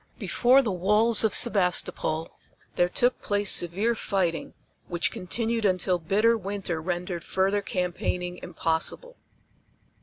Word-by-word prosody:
Before 255 +3 +3
the 220 - -1
walls 210 +5 +2
of 220 - +2
Sebastopol 180 -6 +1 0.4
there 175 - +2
took 245 +7 +1
place 205 -1 +1
severe 195 +7 +1
fighting, 190 -6 -2 0.3
which 175 -1 -1
continued 230 +4 -2
until 185 -2 +1
bitter 210 +7 +2
winter 195 -5 -4
rendered 175 0 -4
further 195 +2 0
campaigning 180 -1 -3
impossible. 175 - -3
190 Hz, 115 wpm, -26 LUFS, 175-220 Hz, 0.4 s, Before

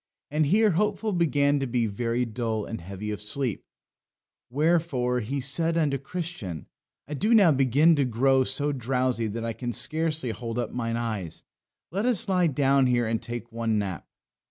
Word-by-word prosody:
And 150 0 +2
here 210 +5 +4
Hopeful 210 +3 0
began 145 -4 +2
to 135 - -2
be 120 -1 0
very 115 +3 -1
dull 110 -2 -3
and 115 - -6
heavy 100 +4 -6
of 105 - -5
sleep, 120 +2 -1 0.9
wherefore 140 -4 +1
he 130 +5 -3
said 165 +5 +1
unto 145 -4 +1
Christian, 140 - -6 0.4
I 150 - -6
do 215 +10 +2
now 195 -7 +6
begin 140 +4 +4
to 140 - +2
grow 130 +3 +3
so 140 +3 -1
drowsy 125 -2 -1
that 115 +2 -4
I 115 - -2
can 120 +1 -4
scarcely 155 -4 0
hold 115 +1 -5
up 120 -2 -2
mine 115 -1 -2
eyes; 105 -8 -4 0.5
let 200 +7 -1
us 235 -5 +3
lie 180 -3 +3
down 135 -2 +3
here 120 -1 +2
and 110 0 -1
take 120 0 -6
one 115 -1 -1
nap." 95 -5 -4
130 Hz, 175 wpm, -26 LUFS, 115-155 Hz, 0.9 s, now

